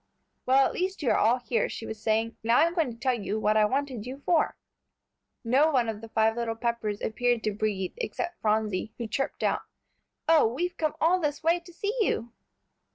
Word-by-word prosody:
"Well, 265 Hz, +1 st, +5 dB
at -, -, -1 dB
last 375 Hz, -3 st, -2 dB
you 250 Hz, -, +3 dB
are -, -, +3 dB
all 230 Hz, +4 st, +4 dB
here," 245 Hz, -1 st, -1 dB
she 225 Hz, -, -6 dB
was 220 Hz, -1 st, -7 dB
saying; 225 Hz, +1 st, 0 dB
"now 230 Hz, +2 st, +3 dB
I'm 335 Hz, +1 st, +4 dB
going 325 Hz, -8 st, 0 dB
to 230 Hz, -, -11 dB
tell 255 Hz, +2 st, +1 dB
you 215 Hz, -2 st, -2 dB
what 215 Hz, 0 st, +2 dB
I 215 Hz, -1 st, +5 dB
wanted 260 Hz, -1 st, -2 dB
you 270 Hz, +3 st, -8 dB
for." 340 Hz, -3 st, +2 dB, 0.9 s
No 265 Hz, +7 st, +4 dB
one 255 Hz, -6 st, +2 dB
of 215 Hz, -1 st, -5 dB
the 225 Hz, -, -10 dB
five 220 Hz, 0 st, +2 dB
little 235 Hz, -1 st, -2 dB
Peppers 225 Hz, -3 st, -2 dB
appeared 240 Hz, +1 st, 0 dB
to 215 Hz, -, 0 dB
breathe, 200 Hz, -3 st, -2 dB
except 350 Hz, -7 st, -4 dB
Phronsie, 215 Hz, -1 st, 0 dB
who 235 Hz, -, -4 dB
chirped 255 Hz, +5 st, -3 dB
out, -, -, +1 dB, 0.7 s
"Oh, 320 Hz, -6 st, +6 dB
we've 350 Hz, +8 st, -2 dB
come 310 Hz, -1 st, -1 dB
all 350 Hz, +3 st, +3 dB
this 295 Hz, -2 st, -2 dB
way 335 Hz, +2 st, +3 dB
to 350 Hz, +1 st, -15 dB
see 405 Hz, +6 st, -3 dB
you!" 240 Hz, -, 0 dB
240 Hz, 210 wpm, -27 LUFS, 220-310 Hz, 0.9 s, Oh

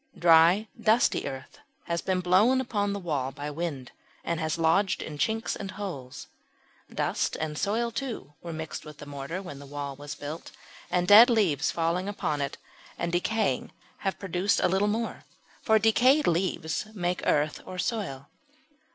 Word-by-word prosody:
Dry 170 Hz, +5 st, +5 dB
dusty 225 Hz, +2 st, +3 dB
earth 135 Hz, -1 st, -8 dB, 0.2 s
has 170 Hz, 0 st, -2 dB
been 185 Hz, -1 st, 0 dB
blown 200 Hz, +9 st, +4 dB
upon 205 Hz, -5 st, -1 dB
the 200 Hz, -, -3 dB
wall 145 Hz, -7 st, -2 dB
by 145 Hz, +2 st, -6 dB
wind, 145 Hz, -5 st, -4 dB, 0.3 s
and 170 Hz, -1 st, -2 dB
has 160 Hz, 0 st, -1 dB
lodged 170 Hz, +3 st, +2 dB
in 150 Hz, -2 st, -7 dB
chinks 225 Hz, +5 st, 0 dB
and 195 Hz, -, -6 dB
holes. 185 Hz, -11 st, -6 dB, 0.7 s
Dust -, -, -1 dB
and 155 Hz, -1 st, -3 dB
soil, 230 Hz, +8 st, 0 dB
too, 235 Hz, -, -5 dB
were 170 Hz, -, -6 dB
mixed 160 Hz, -1 st, -6 dB
with 150 Hz, -2 st, -11 dB
the 150 Hz, -, -10 dB
mortar 145 Hz, +6 st, -5 dB
when 145 Hz, -7 st, -8 dB
the 140 Hz, -, -11 dB
wall 140 Hz, -1 st, -5 dB
was 145 Hz, +1 st, -7 dB
built; 150 Hz, +3 st, -7 dB, 0.4 s
and 180 Hz, 0 st, +1 dB
dead 220 Hz, +6 st, +10 dB
leaves 175 Hz, -, +2 dB
falling 170 Hz, +3 st, 0 dB
on 150 Hz, -2 st, -1 dB
it 140 Hz, 0 st, -3 dB, 0.4 s
and 170 Hz, -, -2 dB
decaying 180 Hz, -, 0 dB, 0.2 s
have 195 Hz, -1 st, -2 dB
produced 190 Hz, +1 st, 0 dB
a -, -, +4 dB
little 190 Hz, +3 st, +2 dB
more 225 Hz, +2 st, -2 dB, 0.4 s
for 220 Hz, -1 st, +4 dB
decayed 250 Hz, +7 st, +4 dB
leaves 170 Hz, 0 st, 0 dB
make 180 Hz, -2 st, -1 dB
earth 150 Hz, 0 st, +1 dB
or 185 Hz, -, -8 dB
"soil." 180 Hz, -, -3 dB
175 Hz, 165 wpm, -27 LUFS, 150-205 Hz, 0.7 s, dead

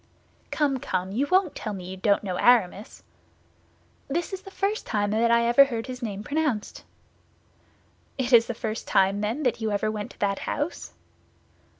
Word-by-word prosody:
"Come, 280 Hz, -3 st, 0 dB
come, 185 Hz, -5 st, -3 dB
you 260 Hz, +8 st, 0 dB
won't 370 Hz, -2 st, +2 dB
tell 215 Hz, -, -5 dB
me 190 Hz, -2 st, -7 dB
you 185 Hz, +1 st, -6 dB
don't 200 Hz, +2 st, +1 dB
know 185 Hz, -3 st, -3 dB
Aramis?" 220 Hz, -4 st, +2 dB, 1.0 s
"This 345 Hz, +7 st, -2 dB
is 385 Hz, -, -4 dB
the 390 Hz, -, -11 dB
first 400 Hz, +2 st, -2 dB
time 205 Hz, -2 st, 0 dB
I 235 Hz, +1 st, +3 dB
ever 240 Hz, +4 st, +6 dB
heard 230 Hz, -4 st, -4 dB
his 255 Hz, -1 st, -7 dB
name 205 Hz, -3 st, -4 dB
pronounced." 285 Hz, -6 st, -2 dB, 1.3 s
"It 260 Hz, -1 st, -1 dB
is 230 Hz, -1 st, +7 dB
the 235 Hz, -, -4 dB
first 220 Hz, -1 st, -4 dB
time, 195 Hz, +1 st, +2 dB
then, 225 Hz, +8 st, -2 dB
that 250 Hz, -3 st, 0 dB
you 220 Hz, -, 0 dB
ever 210 Hz, +1 st, 0 dB
went 210 Hz, -1 st, -5 dB
to -, -, -17 dB
that 200 Hz, -1 st, 0 dB
house?" 295 Hz, +4 st, -4 dB
230 Hz, 175 wpm, -25 LUFS, 205-275 Hz, 1.3 s, is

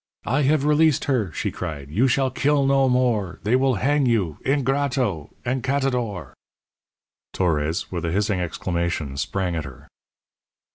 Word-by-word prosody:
"I 135 Hz, +7 st, +1 dB
have 145 Hz, +1 st, +2 dB
released 150 Hz, 0 st, +3 dB
her," 120 Hz, -, 0 dB
she -, -, -3 dB
cried. 70 Hz, -3 st, -6 dB
"You 115 Hz, -, +3 dB
shall 130 Hz, +1 st, +1 dB
kill 140 Hz, +1 st, +2 dB
no 135 Hz, -1 st, +3 dB
more. 120 Hz, -7 st, +1 dB
They 110 Hz, +5 st, +2 dB
will 130 Hz, -1 st, +2 dB
hang 140 Hz, +5 st, +1 dB
you 100 Hz, -10 st, 0 dB
ingrato 135 Hz, -, 0 dB, 0.2 s
encatador!" 125 Hz, -, -1 dB, 1.0 s
Torres, 80 Hz, -1 st, -1 dB
with 85 Hz, -2 st, -3 dB
a 85 Hz, -, -1 dB
hissing 100 Hz, +1 st, 0 dB
exclamation, 85 Hz, -4 st, -2 dB
sprang 90 Hz, +5 st, -2 dB
at 80 Hz, -, -2 dB
her. 65 Hz, -3 st, -12 dB
120 Hz, 140 wpm, -23 LUFS, 85-135 Hz, 1.0 s, released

